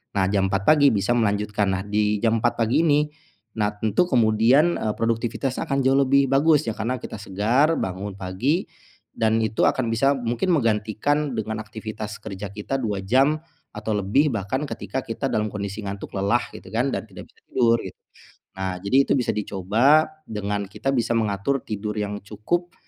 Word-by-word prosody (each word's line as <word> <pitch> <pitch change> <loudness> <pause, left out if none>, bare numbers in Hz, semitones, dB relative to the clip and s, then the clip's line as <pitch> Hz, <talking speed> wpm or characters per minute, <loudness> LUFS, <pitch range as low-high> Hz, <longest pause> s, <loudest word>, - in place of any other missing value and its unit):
Nah, 95 -1 +2
jam 100 -2 +2
4.00 95 0 0
pagi 145 +3 +5
bisa 100 +3 0
melanjutkan. 105 -1 0
Nah, 95 - -1
di 105 0 +1
jam 115 -1 +2
4.00 120 +1 +1
pagi 115 +5 +1
ini, 150 0 +3 0.5
nah 105 0 +2
tentu 110 - +1
kemudian, 120 +7 +4
eee, 110 -1 -1
produktivitas 115 +3 -1
akan 140 -4 -1
jauh 135 +1 +3
lebih 140 0 +4
bagus, 150 +2 +4
ya - - +1
karena 120 +4 -2
kita - - -7
segar 115 +11 +2
bangun 95 +1 -4
pagi 100 - -1 0.5
dan 110 0 +2
itu 110 -1 0
akan 130 -3 +2
bisa 125 +5 +2
mungkin 120 +6 -1
menggantikan 115 +3 +1
dengan 110 -1 -3
aktivitas 110 -1 -7
kerja 100 -2 -7
kita 105 +6 -4
2 105 -3 -1
jam, 135 +10 +2 0.3
atau 105 0 -3
lebih 105 +10 +2
bahkan 110 +7 -2
ketika 135 - -4
kita 130 +2 -3
dalam 110 0 0
kondisi 100 0 -5
ngantuk 100 +1 -6
lelah 100 +5 +1
gitu - - -12
kan 125 +4 0
dan 110 - -4
tidak 95 - -11
bisa - - -29
tidur 115 -2 +3
gitu. - - -8 0.6
Nah, 95 -1 -2
jadi 100 +7 +1
itu - - +1
bisa 125 -4 +1
dicoba 105 - +3 0.2
dengan 105 -1 -3
kita 135 +7 -3
bisa 120 -3 0
mengatur 110 +5 0
tidur 105 0 -4
yang 105 0 -2
cukup 170 - -3
110 Hz, 175 wpm, -23 LUFS, 105-135 Hz, 0.6 s, pagi